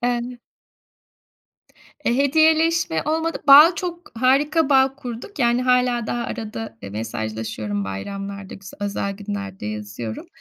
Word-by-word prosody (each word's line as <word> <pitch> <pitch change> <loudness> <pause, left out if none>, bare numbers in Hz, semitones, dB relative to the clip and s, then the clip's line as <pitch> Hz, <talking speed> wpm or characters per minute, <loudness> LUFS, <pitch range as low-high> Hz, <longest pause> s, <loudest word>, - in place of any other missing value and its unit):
Eee, 245 0 0
ne 245 0 -8 1.7
Eee, 235 - +2
hediyeleşme 315 - +3
olmadı. 320 +2 -1
Bağ, 300 +5 +9
çok 350 -1 -6
harika 275 +6 +2
bağ 265 -1 +4
kurduk. 245 - -8
Yani 240 -1 +2
hâlâ 250 -2 +2
daha 240 +1 -2
arada, 225 - -6
eee, 100 - -7
mesajlaşıyorum. 110 -1 -4
Bayramlarda, 195 - -6
güz 195 -1 -11
özel 200 0 -2
günlerde 200 - -6
yazıyorum. 105 +1 -6
235 Hz, 120 wpm, -22 LUFS, 190-275 Hz, 1.7 s, Bağ